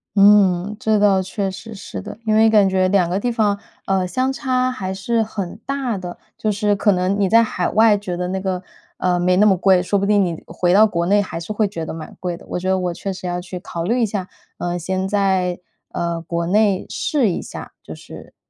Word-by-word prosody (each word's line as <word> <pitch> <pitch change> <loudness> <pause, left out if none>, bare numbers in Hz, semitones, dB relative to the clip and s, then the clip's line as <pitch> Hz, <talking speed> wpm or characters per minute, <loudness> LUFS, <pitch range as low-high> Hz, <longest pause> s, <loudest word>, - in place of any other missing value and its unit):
嗯， 200 -1 +4
这 215 -1 +2
倒 195 -2 +3
确 195 +1 -3
实 225 +4 -9
是 190 - -7
的。 95 - -9
因 215 -1 +2
为 220 +1 +6
感 210 -3 +4
觉 185 -1 +2
2 185 -3 +2
个 185 +3 0
地 245 +3 -1
方， 215 -3 +1 0.3
呃， 190 -1 +1
相 255 +9 -1
差 255 0 0
还 190 -7 -4
是 225 +4 0
很 200 -5 -5
大 270 -5 -2
的， 180 -2 -7 0.2
就 215 - 0
是 205 0 +1
可 205 +1 +2
能 185 +2 0
你 200 - +3
在 230 +4 +6
海 185 -5 -1
外 220 -1 +4
觉 190 -3 -5
得 180 +1 -3
那 190 +1 -2
个 185 -1 -2 0.4
呃， 180 -1 +1
没 180 +1 +2
那 210 - +5
么 195 -2 +4
贵， 185 0 +4
说 195 +3 0
不 200 - 0
定 205 0 +3
你 170 -3 -4
回 175 -1 -1
到 205 +4 +7
国 170 -5 -1
内 205 +2 +4
还 190 -4 -3
是 170 +5 -7
会 215 0 +1
觉 170 -5 -6
得 160 - -5
蛮 160 -1 -9
贵 175 -2 -3
的。 - - -16
我 - - -2
觉 185 +1 -2
得 190 - +2
我 180 -2 -2
确 195 +2 -5
实 185 0 -8
要 175 0 -2
去 180 0 -7
考 170 -1 -5
虑 235 +8 +1
一 - - +4
下， 200 -3 -4 0.3
呃， 175 0 -2
先 185 +2 -2
在， 190 -3 +1 0.3
呃， 170 -1 -3
国 170 +1 -3
内 200 +1 +2
试 280 -8 0
一 - - -3
下， - - -9
就 - - -9
是 - - -13
195 Hz, 255 characters per minute, -20 LUFS, 180-210 Hz, 0.4 s, 到